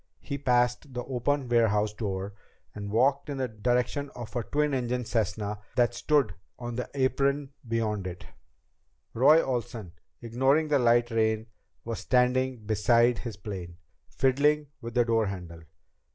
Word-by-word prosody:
He 140 - -5
passed 125 +1 +1
the 125 - -2
open 135 +2 -1
warehouse 110 -3 +2
door 100 -2 -4 0.4
and 100 -1 -6
walked 135 +7 +2
on - - -2
in - - -7
the 130 -1 -1
direction 125 +5 -1
of 120 -1 -8
a 120 - +1
twin 150 +5 0
engine 125 -1 -1
Cessna 105 -2 -2 0.2
that 120 -1 +3
stood 140 - +1 0.2
on 120 -1 -5
the 125 +1 -4
apron 140 +1 +1 0.2
beyond 110 -4 -1
it. 90 0 -8 0.9
Roy 150 +7 +6
Olsen, 120 -7 -3 0.3
ignoring 135 +6 +1
the 145 -2 +3
light 120 0 +3
rain, 110 -1 +1 0.4
was 115 -1 -4
standing 125 -2 +1
beside 115 +3 +3
his 115 -6 -6
plane, 95 -4 -7 0.3
fiddling 145 +3 +2
with 115 +1 -7
the 120 -1 +4
door 115 -2 +2
handle. 90 -4 -7
120 Hz, 150 wpm, -28 LUFS, 110-130 Hz, 0.9 s, Roy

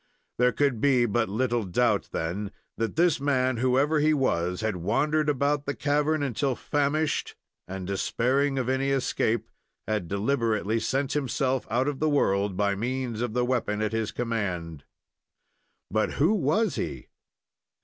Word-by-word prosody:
There 125 0 +4
could 125 -1 0
be 130 -4 +4
but 115 0 0
little 120 +2 0
doubt, 105 +2 +1
then, 95 +5 -3 0.3
that 115 -1 -2
this 170 -1 +3
man, 130 -3 +1
whoever 135 +5 +2
he 155 +1 +3
was, 90 -9 0
had 110 -4 -1
wandered 150 - +1
about 145 +1 0
the 140 - -1
cavern 150 +1 +1
until 135 0 -1
famished, 145 +3 -1 0.3
and, 95 0 -6
despairing 130 +8 0
of 130 -2 -1
any 130 +1 +1
escape, 120 -4 0 0.4
had 105 -5 -1
deliberately 110 +1 0
sent 135 +5 -1
himself 135 -2 -1
out 125 +4 +1
of 145 -2 -2
the 155 - +2
world 100 -9 +1
by 100 0 +2
means 120 +2 -3
of 120 -3 -2
the 125 0 +2
weapon 120 -4 -1
at 110 -1 -1
his 115 -1 -1
command. 90 - -3 1.1
But 110 +1 0
who 160 +9 +3
was 205 +5 +1
he? - - -5
125 Hz, 150 wpm, -27 LUFS, 105-140 Hz, 1.1 s, There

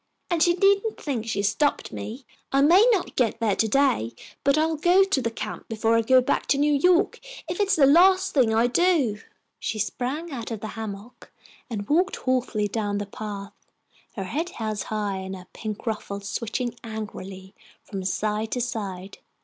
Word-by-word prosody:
And 340 -2 +1
she 345 +1 +5
needn't 400 +3 +2
think 240 -7 -3
she 205 - -2
has 200 0 +2
stopped 290 +6 0
me. 220 - -7 0.3
I 275 - +3
may 370 +11 +6
not 395 -6 0
get 230 -2 +1
there 220 -4 +1
to 220 - +1
day, 210 - +1 0.3
but 280 +1 +3
I'll 320 +1 +2
go 355 +5 +5
to 385 -9 0
that 230 -1 -3
camp 215 0 -6
before 225 +1 +1
I 230 - +4
go 255 +3 +5
back 250 - -1
to 275 - +3
New 295 +1 +3
York 360 +6 +3 0.3
if 345 +3 -4
it's 405 -1 +3
the 285 - +5
last 370 +6 +5
thing 250 -6 +3
I 225 +2 +3
do." 270 - +2 0.4
She 220 - -3
sprang 260 - -3
out 240 -5 -5
of 225 -3 -4
the 215 - -6
hammock 220 +1 -8 0.4
and 205 -4 -4
walked 360 +6 +2
haughtily 250 -5 0
down 205 -1 -2
the 205 - -3
path, 200 -1 -7 0.6
her 195 - -3
head 310 - -3
held 215 - -4
high, 205 -2 -2
and 190 0 -5
her 180 -1 -11
pink 215 -2 -6
ruffles 200 -3 -4
switching 235 +3 -3
angrily 195 -4 -7 0.3
from 195 -2 -6
side 210 +3 -1
to 250 - -1
side. 200 -6 -5
230 Hz, 190 wpm, -25 LUFS, 210-295 Hz, 0.6 s, may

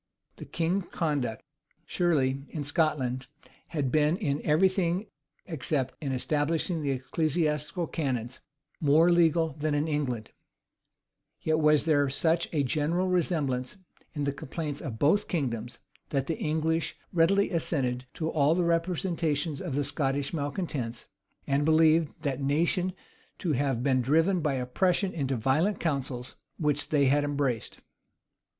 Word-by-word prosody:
The - - -8
king's 175 +3 -1
conduct, 145 -9 -2 0.4
surely, 140 -6 +1
in 150 - -4
Scotland, 140 -5 0 0.4
had 145 -6 -2
been 155 +2 +3
in 150 -8 -1
every 155 +5 +4
thing, 185 +1 0 0.4
except 145 -5 -2
in 140 - -1
establishing 155 +5 0
the 145 - -1
ecclesiastical 150 +4 -1
canons, 130 -7 -3 0.4
more 160 +3 +5
legal 165 -1 +4
than 150 0 -2
in 145 +2 0
England; 130 -8 -2 1.1
yet 155 0 +2
was 150 -1 +4
there 145 -3 +3
such 165 +4 +1
a 150 -3 +1
general 160 +7 0
resemblance 155 -5 0 0.4
in 145 - -2
the 140 - +1
complaints 145 +1 -5
of 115 -6 -5
both 160 - +3
kingdoms, 120 -7 -2 0.3
that 135 -2 0
the 160 - -3
English 160 +1 0 0.2
readily 195 +4 +3
assented 130 -7 -1
to 160 - -2
all 155 0 +3
the 180 - +1
representations 165 -3 0
of 170 -8 -3
the 145 - +1
Scottish 140 0 -1
malecontents, 145 -6 -3 0.4
and 140 +1 +1
believed 160 0 +4
that 140 -2 -1
nation 170 +6 +1 0.4
to 175 - -1
have 135 -3 0
been 130 -2 +3
driven 165 +8 +3
by 150 -4 0
oppression 180 +10 0
into 135 -4 -1
the 115 - -5
violent 160 - +2
counsels 130 -5 -3 0.2
which 145 -1 0
they 145 -2 +3
had 145 +2 +3
embraced. 140 -5 -2
150 Hz, 140 wpm, -28 LUFS, 135-165 Hz, 1.1 s, more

